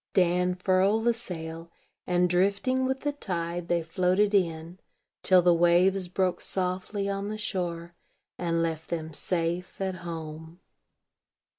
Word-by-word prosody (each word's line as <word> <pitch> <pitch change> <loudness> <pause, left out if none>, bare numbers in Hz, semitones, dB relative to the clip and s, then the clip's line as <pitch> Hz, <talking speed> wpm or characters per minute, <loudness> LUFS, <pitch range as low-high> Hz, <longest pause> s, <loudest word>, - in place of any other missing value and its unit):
Dan 180 0 +3
furled 190 +4 +2
the 235 - +4
sail; 165 -7 -7 0.4
and, 180 0 +3
drifting 200 +9 +1
with 265 0 -2
the 290 - 0
tide, 175 -9 -4
they 170 -1 +1
floated 185 +5 +1
in, 170 -2 0 0.4
till 185 -1 +5
the 175 0 +5
waves 175 +2 +3
broke 185 0 0
softly 190 +2 -1
on 200 0 -2
the 215 +1 -4
shore, 175 -4 -3 0.4
and 170 -1 0
left 160 -1 -3
them 160 -2 -4
safe 175 +2 -2
at 190 -1 -2
home. 160 -1 -8
180 Hz, 135 wpm, -27 LUFS, 170-195 Hz, 0.4 s, till